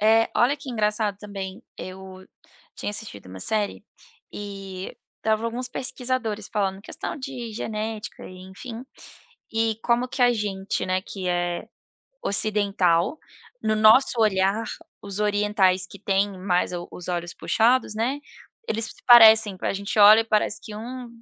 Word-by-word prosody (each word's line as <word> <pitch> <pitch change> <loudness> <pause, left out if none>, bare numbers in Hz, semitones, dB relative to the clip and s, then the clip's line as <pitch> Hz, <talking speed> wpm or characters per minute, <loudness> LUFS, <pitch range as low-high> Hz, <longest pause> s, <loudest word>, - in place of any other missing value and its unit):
É, 225 +2 +4
olha 265 +5 +3
que 280 -2 -8
engraçado 210 -2 0
também, 200 +1 -7
eu 185 0 -9 0.5
tinha - - -3
assistido 205 - -6
uma 95 0 -10
série 210 - -1 0.5
e 195 -2 -7 0.2
estavam 220 +1 0
alguns 245 +2 -3
pesquisadores 250 -5 -2
falando 195 -2 -1
questão 330 - -6
de 255 -4 -6
genética 215 0 -5
e 185 0 -11
enfim. 230 +5 -8 0.7
E 225 -1 0
como 240 +1 +2
que 255 - -4
a 245 0 +6
gente, 205 -2 -2
né, 185 0 0
que 190 -1 -6
é 175 0 -1 0.6
ocidental, 200 - +1 0.4
no 215 - +1
nosso 220 +3 +5
olhar 200 +1 +2 0.4
os 200 0 -5
orientais 205 -3 +2
que 200 - -13
têm 195 -1 0
mais 180 -1 0
o 175 0 -5
os 180 - -10
olhos 175 -1 -3
puxados, 230 0 +2
né, 245 +6 -1 0.5
eles 220 0 -1
se - - -13
parecem, 220 -4 +8
a - - 0
gente 200 +2 -3
olha 210 +2 +9
e - - -1
parece 215 -1 0
que 210 - -9
um 245 +2 -7
210 Hz, 145 wpm, -24 LUFS, 190-225 Hz, 0.7 s, olha